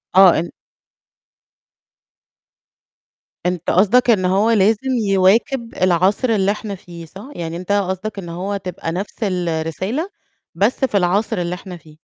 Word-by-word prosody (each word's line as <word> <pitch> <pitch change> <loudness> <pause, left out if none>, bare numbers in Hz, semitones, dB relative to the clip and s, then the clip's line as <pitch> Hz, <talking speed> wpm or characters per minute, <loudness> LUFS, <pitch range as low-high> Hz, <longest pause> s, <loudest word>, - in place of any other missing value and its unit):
آه، 190 -4 +7
أن 170 - -4 2.9
أنت 180 -2 -1
قصدك 230 +7 +4
إن 190 -5 +3
هو 200 +5 +2
لازم 220 +5 +2 0.2
يواكب 225 +6 +2
العصر 185 +7 +2
اللي 200 -2 +2
إحنا 210 -1 -5
فيه، 170 -2 -11
صح؟ 195 - -11
يعني 170 -1 -5
أنت 185 +3 -5
قصدك 200 +1 -1
إن 175 -3 -8
هو 190 +4 -3
تبقى 180 -3 -5
نفس 190 +4 -5
الرسالة، 180 - -2 0.5
بس 205 +8 +1
في 210 - 0
العصر 200 +4 +1
اللي 175 0 -2
إحنا 180 -1 -9
فيه. 155 -2 -18
190 Hz, 135 wpm, -19 LUFS, 175-210 Hz, 2.9 s, آه